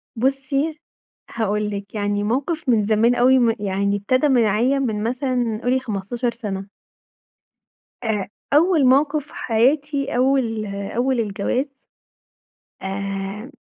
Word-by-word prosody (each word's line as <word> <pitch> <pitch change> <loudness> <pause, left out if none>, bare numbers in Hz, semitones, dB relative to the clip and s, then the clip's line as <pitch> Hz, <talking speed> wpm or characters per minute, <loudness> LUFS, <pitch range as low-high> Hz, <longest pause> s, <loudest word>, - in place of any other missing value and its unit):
بُصّي، 275 +5 -1 0.5
هاقول 210 -1 -1
لِك 200 +1 -7
يعني 205 0 -1
موقف 270 +7 -2
من 220 -4 +3
زمان 225 +3 +3
أوي 255 +2 +5
م 235 -2 +3
يعني 200 0 0
ابتدى 255 +8 +1
معايا 240 +2 +3
من 220 -6 -1
مثلًا 245 -2 -1
قولي 255 +1 +1
15 235 +2 -3
سنة. 200 -4 -6 1.4
آآ، 210 -4 -1 0.3
أول 320 -2 +4
موقف 285 +3 +3
في - - -17
حياتي 275 +4 +1
أول 250 -5 +1
أول 230 +6 -1
الجواز 225 +6 -1 1.1
آآ، 195 +4 -4
235 Hz, 115 wpm, -21 LUFS, 205-265 Hz, 1.4 s, أوي